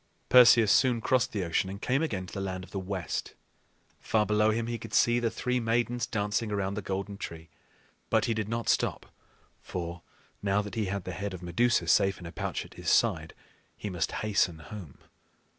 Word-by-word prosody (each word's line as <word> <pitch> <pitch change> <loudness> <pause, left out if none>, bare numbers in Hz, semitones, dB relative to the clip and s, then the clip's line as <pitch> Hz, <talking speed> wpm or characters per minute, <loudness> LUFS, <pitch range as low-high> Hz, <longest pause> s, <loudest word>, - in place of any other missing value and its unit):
Perseus 120 -4 +7
soon 125 -3 +4
crossed 120 +3 +1
the 100 -3 -2
ocean 85 +2 0
and 100 +1 -6
came 130 +6 +1
again 100 -13 -2
to - - -12
the 100 - -3
Land 95 -1 -4
of - - -13
the 100 - -3
West. 95 -2 -4 0.6
Far 110 -1 +1
below 105 +1 +3
him 115 +1 0
he 115 0 -3
could 105 0 -6
see 120 0 +4
the 120 -1 +1
three 125 +2 -1
Maidens 120 +1 0
dancing 105 0 -1
around 100 -1 -1
the 105 - -3
golden 100 +1 -4
tree; 80 -1 -7 0.6
but - - +3
he 115 - +1
did 110 -1 -3
not 115 0 -2
stop, - - +1 0.6
for, 85 -1 -5 0.4
now 100 +1 +1
that 105 -2 -8
he 110 0 -1
had 100 0 -3
the 90 - -5
head 95 +2 -4
of 90 - -10
Medusa 100 +3 +2
safe 95 +3 +3
in - - -12
the 85 - -7
pouch - - -3
at - - -15
his - - -4
side, - - +2 0.4
he 105 - -5
must 90 -3 -1
hasten 95 -5 +1
home. 80 -1 -10
105 Hz, 205 wpm, -29 LUFS, 95-115 Hz, 0.6 s, Perseus